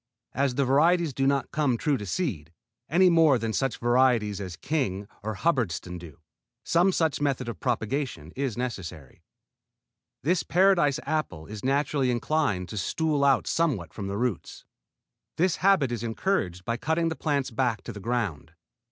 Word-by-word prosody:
As 135 -1 0
the 140 0 +2
variety 165 +7 +4
does 135 -2 -1
not 140 -1 0
come 145 -6 +1
true 150 +3 +1
to 105 -5 -5
seed, 90 - -3 0.4
any 185 +4 +5
more 165 -6 +5
than 115 -1 -3
such 135 +1 -1
varieties 120 -4 +2
as 90 -3 -6
King 105 -11 -2
or 110 +1 -4
Hubbardston 95 - -1
do, 85 -4 -12 0.5
some 175 +3 +3
such 160 -5 0
method 135 -4 0
of 115 - -5
propagation 120 - -2
is 130 -5 -2
necessary. 90 - -6 1.0
This 170 +5 +2
Paradise 175 -6 +3
apple 150 - -2
is 105 +2 -8
naturally 140 0 +1
inclined 120 - 0
to 105 - -6
stool 150 - 0
out 140 -1 +4
somewhat 130 - 0
from 100 -3 -5
the 100 +1 -3
roots. 120 -5 -3 0.7
This 180 +1 +2
habit 180 -9 +3
is 120 -3 -3
encouraged 115 - -1
by 115 0 -1
cutting 160 +5 0
the 160 - -3
plants 140 -5 -1
back 120 -1 -1
to 120 - -7
the 100 - -8
ground. 100 - -3
130 Hz, 160 wpm, -27 LUFS, 105-155 Hz, 1.0 s, any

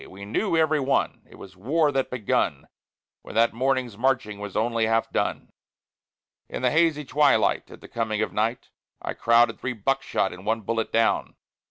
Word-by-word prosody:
We 100 +1 -10
knew, 165 - 0
every 155 -1 +3
one, 135 0 0
it - - -15
was 95 -1 -12
war 145 - +1
that 135 -1 -1
begun, 120 -5 -1 0.5
When - - -11
that 115 +1 +3
morning's 125 -3 -1
marching 125 -5 0
was 105 -2 -5
only 115 0 +1
half 115 0 +1
done. - - -2 1.0
In - - -5
the 125 - +3
hazy 155 -2 +2
twilight, 145 +2 +2
at - - -13
the - - -11
coming 110 -2 -1
of - - -4
night, 115 +4 -2 0.3
I - - -4
crowded 115 0 +3
three 130 - -3
buckshot 120 -3 -1
and 90 +1 -11
one 110 +2 0
bullet 115 +2 -2
down. 115 0 +1
115 Hz, 175 wpm, -25 LUFS, 110-135 Hz, 1.0 s, every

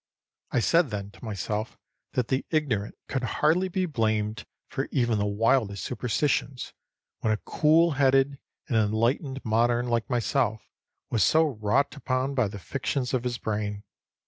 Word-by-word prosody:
I 125 - +1
said 165 +3 +3
then 100 -2 -5
to - - -18
myself 105 +1 -3 0.4
that 125 -2 0
the 130 0 +1
ignorant 130 -10 0
could 135 - -2
hardly 155 - +2
be 185 0 -1
blamed 110 -6 -1 0.2
for 135 - -3
even 120 -5 +1
the 100 - +1
wildest 105 -2 +1
superstitions, 125 +2 -1 0.5
when 110 - 0
a 110 - +2
cool 160 +8 +3
headed 135 0 +3 0.3
and 125 - -1
enlightened 115 +6 0
modern 120 +2 +2
like 115 -2 0
myself 120 -2 0 0.5
was 110 -5 +3
so 160 +1 +5
wrought 125 +1 0
upon 135 -1 -1
by 125 -5 +2
the 100 +1 -7
fictions 125 - -2
of 125 -2 +1
his 125 -1 -2
brain. 105 -2 -3
120 Hz, 150 wpm, -27 LUFS, 110-140 Hz, 0.5 s, so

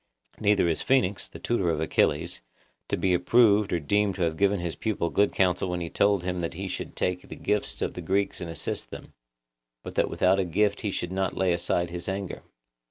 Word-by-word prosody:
Neither 105 -4 +3
is 80 - 0
Phoenix, 100 -7 +1
the - - -11
tutor 105 -7 0
of 80 -2 0
Achilles, 80 -2 +1 0.5
to - - -1
be 95 -1 +1
approved 105 +3 +4
or 85 - +1
deemed 100 +5 +1
to 90 - -1
have 80 -2 0
given 100 +2 +2
his 85 -2 -3
pupil 100 -6 -2
good 100 +1 +3
counsel 90 0 +1
when 90 0 -2
he 85 -1 -5
told 100 -3 +2
him 90 0 -2
that 85 -1 -3
he 95 +2 -4
should - - -5
take 90 0 -2
the - - -7
gifts 105 -1 -1
of - - -2
the 90 - -6
Greeks 95 +4 0
and 85 - -5
assist 80 - -4
them; - - -10 0.7
but - - -7
that - - +1
without 95 +1 +2
a - - +3
gift 100 +4 +1
he 105 - -1
should 90 -2 -3
not 95 -1 -1
lay 95 -1 +2
aside 85 0 0
his 90 +2 -5
anger. 95 -1 -4
90 Hz, 220 wpm, -27 LUFS, 85-100 Hz, 0.7 s, approved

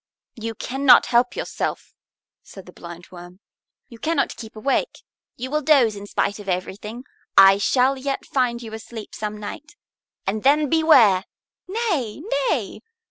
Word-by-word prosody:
"You 225 -1 -6
cannot 265 +4 +4
help 245 +1 +2
yourself," - - -4 0.5
said 195 - -13
the 180 - -14
Blindworm. 175 +1 -12 0.5
"You 235 - -14
cannot 330 +5 -1
keep 220 -1 -11
awake. 275 - -2 0.3
You 255 +2 -6
will 305 +1 0
drowse 265 -7 +4
in 200 0 -9
spite 200 0 -1
of 200 -1 -8
everything. 200 +6 -4 0.3
I 195 0 +8
shall 255 +5 +2
yet 275 +1 -3
find 245 -3 -1
you 220 -1 -9
asleep 220 0 -9
some 210 0 -5
night, 275 - -9 0.5
and 210 +3 -2
then 290 +3 +3
beware!" 250 - +5 0.4
"Nay, 355 - -2 0.3
nay!" - - -2
230 Hz, 140 wpm, -22 LUFS, 205-275 Hz, 0.5 s, I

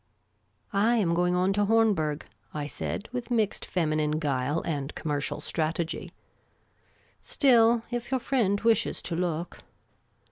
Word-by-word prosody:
" - - -38
I 215 +4 +3
am 190 -7 +2
going 180 +1 +2
on 185 +2 +2
to 205 +1 +2
Hornberg," 200 -9 +2 0.3
I 150 -1 -2
said, 175 +7 -4
with 245 -1 -4
mixed 220 -4 0
feminine 155 -3 0
guile 145 0 0
and 145 -3 -3
commercial 145 -2 -2
strategy; 165 +1 -2 0.6
" - - -37
still, 235 -4 +5
if 240 -1 -3
your 260 -1 +1
friend 225 -6 +1
wishes 225 -2 +2
to 170 - -3
look 170 -1 -2
180 Hz, 140 wpm, -27 LUFS, 155-225 Hz, 0.6 s, still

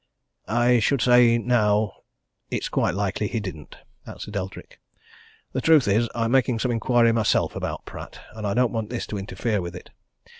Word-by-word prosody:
"I 120 +1 +3
should 135 +5 +1
say 120 -1 +5
now 110 -3 +2 0.6
it's - - -3
quite - - 0
likely 100 +1 -1
he 115 - -2
didn't," 90 -8 -8 0.3
answered 105 - -8
Eldrick. 95 -1 -6 0.7
"The 130 - -1
truth 155 -6 +5
is, 110 +4 +2
I'm 115 -1 0
making 125 -2 +2
some 125 +2 -1
inquiry 120 0 +3
myself 115 -2 +1
about - - -4
Pratt - - -10
and 110 -1 -5
I 100 - -1
don't 125 -1 +2
want 110 -2 -3
this 120 0 -4
to 105 - -5
interfere 105 +1 -2
with 85 -1 -6
it. - - -11
115 Hz, 175 wpm, -24 LUFS, 105-120 Hz, 0.7 s, say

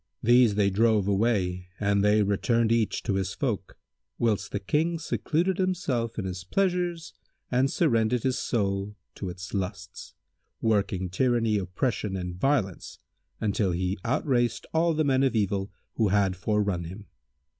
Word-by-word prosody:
These 120 -2 +5
they 100 -1 +2
drove 110 -1 +3
away 95 -4 0
and 100 -1 +2
they 105 +1 +4
returned 115 +3 +1
each 115 -2 +1
to 105 - -1
his 95 -1 -2
folk, - - -3 0.4
whilst 105 -4 0
the 100 - -2
King 155 - 0
secluded 170 +3 -1
himself 145 -12 -1
with 105 - -2
his 90 -1 -5
pleasures 175 - -1 0.4
and 130 +2 +3
surrendered 115 -7 +1
his 130 -1 0
soul 100 -2 -1 0.2
to 95 - -5
its 90 +1 -8
lusts, 95 -2 -5 0.4
working 100 -4 0
tyranny, 115 -1 +2
oppression 100 - -2
and 90 -1 -4
violence, 100 -3 -1 0.6
till 95 -4 +1
he 90 +2 -1
outraced 120 -1 0
all 165 0 +2
the 155 - +2
men 135 -2 +2
of 135 -3 +2
evil 100 -2 0 0.2
who 110 - +1
had 100 -1 +2
forerun 100 -2 0
him. 95 +5 -9
105 Hz, 145 wpm, -27 LUFS, 95-125 Hz, 0.6 s, These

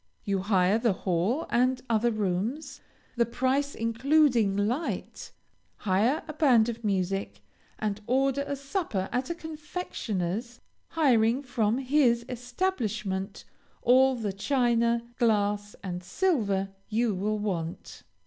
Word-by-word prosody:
You 200 -1 0
hire 190 +1 +2
the 230 -3 +2
hall 190 - +1
and 255 +1 +2
other 230 +1 +2
rooms, 215 - -2 0.4
the 235 - +4
price 265 +4 0
including 230 -2 +2
light, 240 +11 -2 0.5
hire 215 +9 +1
a 310 - -5
band 250 -7 +4
of 235 0 -6
music, 195 -1 -2 0.3
and 210 -1 -2
order 270 +2 +2
a 280 - -2
supper 275 - -3
at 250 +2 -1
a 340 - -2
confectioners, 250 - -4 0.3
hiring 255 -4 +2
from 230 -3 0
his 255 -3 +2
establishment 225 - -3 0.4
all 260 +2 +5
the 215 -5 -3
china, 235 +1 +1 0.2
glass, 205 -3 +1
and 180 -2 -4
silver 200 - 0 0.2
you 225 0 +1
will 210 +3 -1
want. 175 -6 -4
230 Hz, 120 wpm, -28 LUFS, 200-265 Hz, 0.5 s, all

